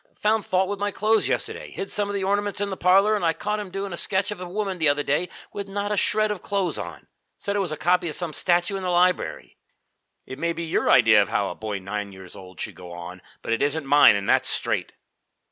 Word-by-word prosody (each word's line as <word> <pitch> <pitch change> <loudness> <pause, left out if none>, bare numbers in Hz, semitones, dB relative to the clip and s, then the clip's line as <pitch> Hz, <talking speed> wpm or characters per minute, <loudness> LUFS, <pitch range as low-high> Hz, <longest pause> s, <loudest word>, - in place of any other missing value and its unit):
Found 215 -1 0
fault 185 0 +2
with 200 0 -4
my 205 0 0
clothes 215 +2 +1
yesterday, - - -3
hid 195 - -6
some 205 -1 -1
of 205 - -3
the 195 - -1
ornaments 205 +1 0
in 200 -1 -1
the - - -2
parlor, 195 +4 +4
and 205 - -2
I 165 -1 +3
caught 210 +6 -3
him 205 -2 -6
doing 195 0 -4
a - - -4
sketch 190 +3 0
of 195 -3 -6
a 180 - -6
woman 195 -1 -3
the 155 -2 +5
other 145 0 +1
day 150 +6 0 0.2
with 200 -1 -5
not 200 +1 -3
a - - +1
shred 215 +2 +1
of 205 - -4
clothes 195 -3 -1
on. - - -8 0.3
Said 200 -1 -3
it - - +1
was 185 -5 -1
a 155 - -3
copy 180 0 +2
of 150 - -3
some 170 -4 -3
statue 175 +4 +1
in - - -5
the 185 - -2
library. 180 +1 +1 0.7
It 130 - -9
may 170 +1 0
be 170 - -5
your 160 - 0
idea - - +6
of - - -1
how - - 0
a - - -5
boy 110 -2 -4
nine 100 +1 -5
years 95 -1 -12
old 95 -1 -12
should - - -4
go 90 -1 -11
on, 90 +1 -8 0.2
but 115 - -1
it 115 - -1
isn't 145 +1 0
mine, 145 -5 +7
and 100 -1 -3
that's - - +3
straight." - - -1
180 Hz, 260 wpm, -24 LUFS, 145-200 Hz, 0.7 s, mine